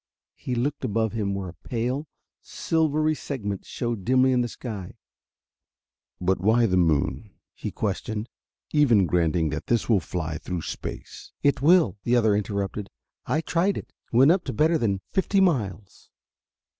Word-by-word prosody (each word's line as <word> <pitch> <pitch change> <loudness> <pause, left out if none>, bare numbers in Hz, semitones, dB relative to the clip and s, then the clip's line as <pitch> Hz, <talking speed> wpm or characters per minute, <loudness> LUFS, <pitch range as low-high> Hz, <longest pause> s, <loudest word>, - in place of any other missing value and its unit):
He 125 - -4
looked 130 +5 -1
above 110 0 0
him 100 -3 -1
where 95 -2 -4
a - - -10
pale, 125 +6 -2 0.3
silvery 155 -1 0
segment 105 -10 -5
showed 120 -5 -3
dimly 130 +4 +4
in 125 -1 +3
the 120 - 0
sky. 105 -6 -7 1.2
"But 95 +1 +1
why 115 +4 +4
the 95 -4 +1
moon?" 85 +5 +1 0.2
he - - -5
questioned. 105 +2 -3 0.4
"Even 120 -10 +4
granting 85 -1 +1
that - - -5
this 120 -1 +1
will 110 -4 +4
fly 80 -2 -4
through 90 -3 -4
space...." - - -7
"It 140 -2 +2
will," 155 - +4
the 120 - +2
other 110 -4 +4
interrupted. 100 0 -2 0.4
"I 155 - +1
tried 175 +5 +1
it. - - -8 0.2
Went 130 +6 +6
up 180 0 +2
to - - -3
better 160 +2 +3
than 100 -6 0
fifty 195 +1 +2
miles." 110 - -1
115 Hz, 155 wpm, -25 LUFS, 95-140 Hz, 1.2 s, Went